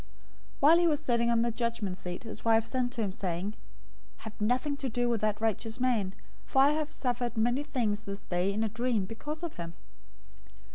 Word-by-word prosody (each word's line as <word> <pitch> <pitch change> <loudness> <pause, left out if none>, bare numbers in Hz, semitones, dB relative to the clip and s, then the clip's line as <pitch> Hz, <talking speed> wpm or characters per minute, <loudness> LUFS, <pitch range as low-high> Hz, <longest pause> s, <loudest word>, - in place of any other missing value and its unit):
027:019 - - -22 0.5
While 310 +4 +8
he 345 - +4
was 300 -3 +2
sitting 235 -5 +1
on 230 -1 +3
the 235 - +1
judgment 230 -5 -2
seat, 180 -1 -6
his 220 -2 -8
wife 225 -1 +4
sent 245 +1 -1
to 235 - -2
him, 200 - -1
saying, 185 +2 -3 0.7
"Have 220 0 -9
nothing 255 +6 +1
to 270 -1 -2
do 245 +1 0
with 235 -3 +1
that 215 -1 +1
righteous 225 +1 -1
man, 225 -7 +1 0.3
for 265 - +1
I 285 - +6
have 305 0 -1
suffered 245 -2 -2
many 240 +5 +2
things 230 -7 -1
this 200 0 -6
day 180 +2 0
in 215 +2 0
a - - +2
dream 235 -2 0
because 295 - -6
of 340 - -5
him." 170 -1 -6
230 Hz, 205 wpm, -30 LUFS, 210-255 Hz, 0.7 s, While